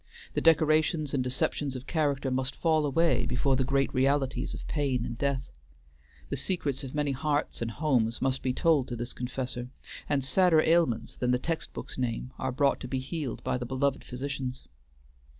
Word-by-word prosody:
The - - 0
decorations 155 -1 +3
and 135 -2 +1
deceptions 135 +2 -1
of 130 0 -6
character 145 -4 0
must 130 +1 -1
fall 155 -3 +2
away 140 -4 +2
before 130 +2 +2
the 130 - +2
great 135 +1 +1
realities 135 0 +1
of - - -8
pain 135 -5 0
and 120 - -4
death. 140 +1 -1 0.8
The - - -1
secrets 150 -7 -1
of 135 +1 -7
many 145 -1 +1
hearts 145 +1 -1
and 115 - -1
homes 120 -4 +1
must 135 0 0
be 130 - 0
told 145 0 +2
to 120 - -4
this 120 +1 -5
confessor, 125 0 -4 0.4
and 140 -2 +1
sadder 165 +4 +4
ailments 160 -9 +2
than 125 - 0
the 125 - +4
text 160 +5 -3
books - - -6
name 125 0 -2
are 130 - -1
brought 140 +2 +2
to - - -6
be 135 - -2
healed 135 +1 -4
by 125 - 0
the 120 - -3
beloved 135 +2 0
physicians. 130 0 -5
135 Hz, 185 wpm, -29 LUFS, 125-150 Hz, 0.8 s, sadder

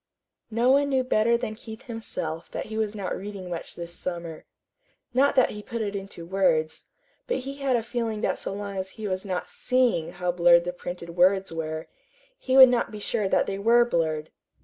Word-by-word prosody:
No 235 +3 +3
one 280 +1 +4
knew 265 -2 +2
better 235 -1 +3
than 235 -2 -4
Keith 220 0 -10
himself 170 -9 -4
that - - -5
he 220 - -7
was 215 -1 -1
not 200 -3 -3
reading 195 -2 -7
much 170 -1 -5
this 170 0 -7
summer. 170 -3 -6 0.7
Not 275 +3 +3
that 255 - +4
he 210 - -7
put 230 0 -4
it 205 -1 -3
into 195 -4 -7
words, 165 -4 +1 0.4
but - - -1
he 275 +1 -6
had 275 -2 +1
a 230 - 0
feeling 230 -2 -3
that - - 0
so - - -3
long 200 0 -5
as 190 0 -2
he 215 -1 -4
was 185 +1 -2
not 185 -2 -2
SEEING 245 -10 +1
how 180 0 -1
blurred 170 0 +5
the 180 0 -3
printed 175 -1 -7
words 190 0 +3
were, 160 -1 -4 0.5
he 260 - +1
would 260 -1 +11
not 245 -1 +1
be 210 - -8
sure 205 -1 -1
that - - +3
they 195 0 -3
were 235 +3 +5
blurred. 160 -7 -1
200 Hz, 205 wpm, -26 LUFS, 175-235 Hz, 0.7 s, would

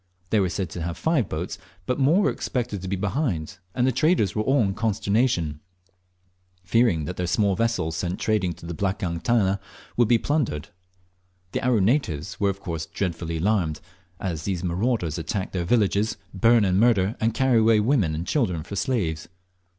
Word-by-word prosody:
They 110 - +4
were 95 -2 +2
said 90 -1 -3
to 85 - -5
have 85 +1 -3
five 160 - +1
boats, 85 +4 -4 0.3
but 125 - -1
more 150 +9 +4
were - - +3
expected 120 -6 -3
to 95 - -6
be 100 - -1
behind 95 - -2 0.2
and 125 - +2
the 130 - +3
traders 130 - +2
were 105 - 0
all 135 +4 +3
in 95 -1 0
consternation, 105 - 0 1.0
fearing 90 -5 +2
that 90 - -5
their 90 - -1
small 100 +1 +2
vessels 95 -7 0
sent 90 0 -2
trading 105 -5 +1
to 85 +1 -13
the 85 - -5
"blakang 90 -2 -2
tana" 100 -2 +2 0.4
would 120 -2 +4
be 120 +1 +5
plundered. 115 - -1 0.8
The - - -2
Aru 120 -4 +3
natives 95 - 0
were 100 -1 +2
of 100 0 -4
course 80 -3 -4
dreadfully 85 -2 -3
alarmed, 85 -4 0 0.4
as 85 -5 -3
these 95 -3 -2
marauders 90 - 0
attack 95 +4 -3
their 90 -2 -2
villages, 105 +1 +2 0.2
burn 115 +3 +4
and 95 0 +2
murder, 110 -3 +3
and 115 +1 +2
carry 130 -3 +3
away 110 -1 +5
women 105 - +2
and 80 +3 -4
children 90 - 0
for 100 - -7
slaves. 95 - -1
100 Hz, 180 wpm, -25 LUFS, 85-115 Hz, 1.0 s, be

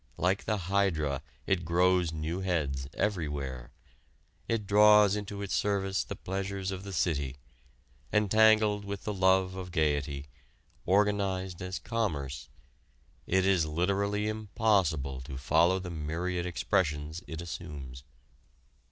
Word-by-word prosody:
Like 95 +3 +1
the 105 - 0
hydra, 85 -7 0 0.2
it 90 -3 +1
grows 90 0 +2
new 80 +3 -3
heads, 75 -8 -1
everywhere. 75 - -2 0.8
It 115 -3 -1
draws 105 0 +6
into 100 -1 -5
its 100 - -4
service 95 -1 0
the - - -6
pleasures 95 0 -3
of 95 0 -5
the 100 - -7
city. 75 -7 -1 0.8
Entangled 105 0 +4
with 100 -1 -6
the 105 - -2
love 95 -1 +3
of 95 -1 -6
gaiety, 75 -4 0 0.6
organized 95 -2 +1
as 90 -1 -4
commerce, 70 - -3 0.8
it 95 +1 +2
is 90 -5 +3
literally 100 +6 0
impossible 100 - 0
to 65 +1 -7
follow 80 +6 +3
the 90 -1 -6
myriad 85 +3 -2
expressions 80 -2 -1
it 80 - -6
assumes. 70 -6 -7
90 Hz, 120 wpm, -30 LUFS, 75-100 Hz, 0.8 s, draws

